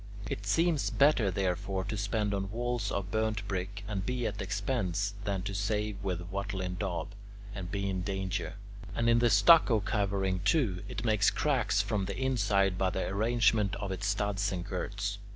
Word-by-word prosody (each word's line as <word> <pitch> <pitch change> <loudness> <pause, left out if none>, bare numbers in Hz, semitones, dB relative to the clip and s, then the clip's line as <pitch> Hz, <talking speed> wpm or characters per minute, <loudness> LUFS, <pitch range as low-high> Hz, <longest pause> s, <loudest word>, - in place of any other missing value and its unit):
It 100 - -5
seems 165 - +2
better, 140 -8 +4
therefore, 95 +1 -1
to 105 +2 -4
spend 105 0 -1
on 95 -1 -2
walls 120 -1 -2
of 100 -1 -3
burnt 110 -2 -1
brick, 100 +2 -4
and 100 -3 -2
be 125 +2 -2
at 105 -2 -3
expense, 100 -1 -1
than 100 -2 -1
to 100 - -4
save 105 0 -2
with 90 -2 -3
"wattle 100 0 -3
and 90 0 -3
daub," 95 -1 -2 0.4
and 95 -3 -5
be 100 0 -2
in 95 -1 -1
danger. 95 0 -3 0.4
And, 115 - +1
in 115 0 +5
the 120 0 +4
stucco 110 +3 +6
covering, 100 -2 0
too, 100 - +1
it 110 +3 -5
makes 105 -2 +4
cracks 110 -9 +1
from 100 -2 -1
the - - -4
inside 100 -8 +1
by 95 - +2
the 95 - -2
arrangement 105 0 +2
of 100 -2 -4
its 95 +2 -2
studs 100 0 0
and 90 -2 -3
girts. 100 +2 -3
100 Hz, 180 wpm, -31 LUFS, 95-110 Hz, 0.4 s, stucco